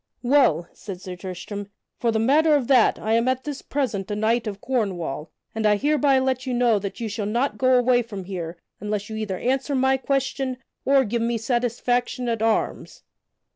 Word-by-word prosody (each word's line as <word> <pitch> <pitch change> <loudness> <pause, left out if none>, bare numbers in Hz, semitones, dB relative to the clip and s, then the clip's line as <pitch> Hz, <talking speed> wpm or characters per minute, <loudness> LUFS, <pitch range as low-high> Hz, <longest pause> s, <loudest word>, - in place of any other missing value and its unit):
"Well," 240 - +3
said 195 -4 -8
Sir 185 0 -7
Tristram, 190 +2 -6 0.3
"for 235 - +1
the 220 - 0
matter 295 +7 +4
of 280 -4 +1
that, 255 -5 +5
I 220 - -1
am 230 +2 +2
at 260 0 0
this 290 -2 -5
present 230 -9 -2
a 205 - -2
knight 225 +2 +1
of 200 -1 -5
Cornwall, 185 - -2 0.2
and 220 - -3
I 210 - +5
hereby 285 +3 +3
let 260 0 0
you 250 - 0
know 240 -3 +3
that 200 0 -6
you 230 - -2
shall 210 -1 -3
not 240 +6 -1
go 255 -1 +4
away 245 0 +4
from 210 -5 -7
here 175 -3 -5 0.2
unless 210 +1 -3
you - - -4
either 210 -4 -3
answer 270 +5 0
my 265 0 +3
question 270 -1 -1 0.3
or 275 0 +5
give 230 +2 -1
me 235 0 0
satisfaction 245 +1 -1
at 230 -2 -1
arms." 225 0 -1
235 Hz, 195 wpm, -24 LUFS, 205-260 Hz, 0.3 s, that